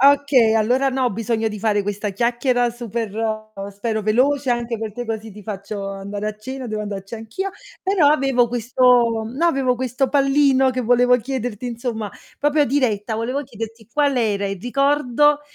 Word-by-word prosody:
Okay, 275 -4 +5
allora 250 +5 +2
no, 260 0 0
ho 245 - +2
bisogno 225 +1 -1
di 210 - -6
fare 205 -1 +1
questa 205 +1 -3
chiacchiera 240 +3 +1
super 235 -2 -4 0.6
spero 220 +1 -2
veloce, 260 +6 +2
anche 240 -1 -1
perchè 220 +2 -5
così 220 -1 -5
ti 210 +1 -12
faccio 200 0 -5
andare 200 +1 -4
a 215 - -6
cena, 260 +3 -6
devo 215 -1 -3
andarci 200 0 -6
anch'io. 225 - -4 0.3
Però 380 -5 +3
avevo 270 -4 +3
questo 240 -1 +3
no, 260 +9 -2
avevo 270 -6 +2
questo 255 +2 -1
pallino 275 -1 +3
che 255 0 -2
volevo 245 +1 +4
chiederti, 245 -2 -4
insomma, 235 -3 -4 0.3
proprio 295 +1 +3
diretta, 230 -6 0
volevo 250 +5 -2
chiederti 225 -3 -8
qual 285 -2 +2
era 205 -4 +1
il 195 -2 -4
ricordo 280 +3 +2
240 Hz, 160 wpm, -21 LUFS, 220-265 Hz, 0.6 s, Okay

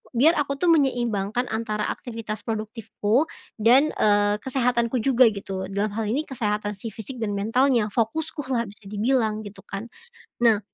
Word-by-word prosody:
biar 295 +8 +5
aku 280 -1 -3
tuh 350 +5 +2
menyeimbangkan 240 -6 +1
antara 215 -1 -2
aktivitas 225 -3 -5
produktifku 220 +3 -1 0.4
dan, 260 +7 +5
eee, 205 0 +3
kesehatanku 250 -2 +1
juga 255 -1 +5
gitu, 195 -2 -5
dalam 200 +2 -1
hal 225 +1 -2
ini 285 +8 0
kesehatan 210 -5 -2
si 205 +3 -7
fisik 220 +5 -8
dan 210 -2 -1
mentalnya, 230 +2 +2
fokuskulah 260 0 -1
bisa 205 0 -13
dibilang 220 0 +1
gitu 205 0 -10
kan. 195 +3 -6 0.6
Nah, 220 -3 +5
225 Hz, 145 wpm, -24 LUFS, 210-255 Hz, 0.6 s, biar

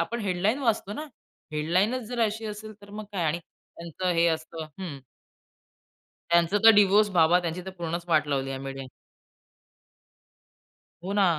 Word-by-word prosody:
आपण 235 +8 -2
हेडलाईन 200 +5 0
वाचतो 225 -6 0
ना. 300 +8 -5 0.5
हेडलाईनच 185 +11 +1
जर 245 -1 -3
अशी 220 +1 -3
असेल, 215 +1 -7
तर 200 - -14
मग 215 +1 -7
काय? 180 -4 -1
आणि 160 +2 0
त्यांचं 170 +1 -6
हे 170 - +5
असतं 160 0 -3
हं. 160 -7 -5 1.3
त्यांचं 170 +4 +4
तर 225 - +10
डिव्होर्स 205 +1 +5
बाबा. 175 -1 +4
त्यांची 175 0 -4
तर - - -4
पूर्णच 170 0 -4
वाट 150 -3 +2
लावली 135 -1 -1
आहे 135 0 -4
मीडिया 135 0 -6 2.2
हो 195 +2 -3
ना. 205 -1 +4
180 Hz, 155 wpm, -27 LUFS, 160-210 Hz, 2.2 s, तर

